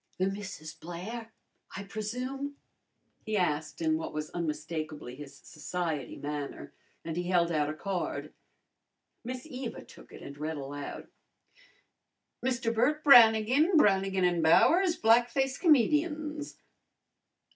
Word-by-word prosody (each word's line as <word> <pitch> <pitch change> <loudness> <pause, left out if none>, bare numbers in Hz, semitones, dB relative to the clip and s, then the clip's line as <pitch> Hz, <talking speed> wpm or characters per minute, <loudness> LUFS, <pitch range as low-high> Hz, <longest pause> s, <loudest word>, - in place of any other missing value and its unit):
"The 185 - +1
Misses 195 -5 -5
Blair, 200 +9 -7 0.5
I 200 - -5
presume?" 250 +8 -5 0.7
he 215 -1 -1
asked 160 -2 -1
in 160 -1 +2
what 160 - -6
was 155 0 -4
unmistakably 155 -4 -4
his 140 0 -11
society 155 -3 -4
manner, 145 -1 -6 0.3
and 165 -1 -4
he 175 +1 -3
held 170 -2 +2
out 150 -2 +1
a 155 - -4
card. 190 +1 -4 0.9
Miss 250 +2 -6
Eva 255 -5 -7
took - - -16
it - - -11
and 140 +1 -10
read 155 +1 -3
aloud, 140 +1 -7 1.4
"Mr. 245 -2 0
Bert 290 +7 +1
Brannigan, 245 - +6
Brannigan 195 -6 +3
and 175 -1 +2
Bowers, 340 - +5
Black 230 +2 +4
Face 265 +1 -1
Comedians." 300 0 +1
195 Hz, 125 wpm, -30 LUFS, 155-250 Hz, 1.4 s, Brannigan